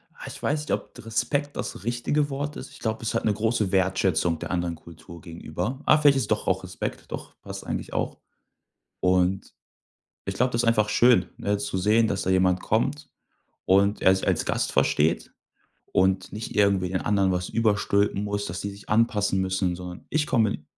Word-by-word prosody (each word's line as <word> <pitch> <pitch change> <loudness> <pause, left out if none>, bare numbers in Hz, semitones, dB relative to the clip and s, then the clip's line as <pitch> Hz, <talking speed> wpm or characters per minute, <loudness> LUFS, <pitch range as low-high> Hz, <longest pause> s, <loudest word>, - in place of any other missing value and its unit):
Ah, - - -10
ich - - -9
weiß 150 +1 0
nicht, 150 - -6
ob - - -2
Respekt 140 +6 -1
das 90 - -5
richtige 120 +5 0
Wort 145 +2 -4
ist. - - -8
Ich - - -14
glaube, 110 -1 -2
ist 110 - -2
halt - - -1
'ne 105 - +3
große 110 -2 0
Wertschätzung 95 -3 +1
der - - -5
anderen 85 -2 -1
Kultur 85 +1 -13
gegenüber. 85 - -5
Ah, 155 - +6
vielleicht 145 -2 +5
ist 110 -5 -2
doch 105 - 0
auch 95 0 +1
Respekt. 90 0 -6
Doch - - -7
passt - - -8
eigentlich - - -4
auch. - - -2 0.8
Und, 90 +1 +1 0.7
ich 95 0 -3
glaube, 125 +3 +1
das 115 0 +1
ist 115 - 0
einfach 105 -2 +3
schön, 120 -5 +5
ne, 100 0 0
zu 100 -3 -3
sehen, 110 +4 +3
dass 100 -2 -1
da 95 - -1
jemand 95 -1 +3
kommt 140 +7 -1 0.6
und 100 +2 +3
er 95 - +5
sich - - -4
als - - +1
Gast - - -1
versteht 75 +2 +1 0.6
und 95 0 +2
nicht 110 +1 -6
irgendwie 100 -3 +3
den 95 - -1
anderen 100 -2 +2
was 90 0 -2
überstülpen 105 -2 +1
muss, 100 0 -2
dass 90 +3 -5
sie 100 - -3
sich 100 +1 -13
anpassen 105 -3 +2
müssen, 95 -1 0
sondern 90 0 -9
ich 150 -1 +1
komme 110 - +1
100 Hz, 195 wpm, -25 LUFS, 95-115 Hz, 0.8 s, Ah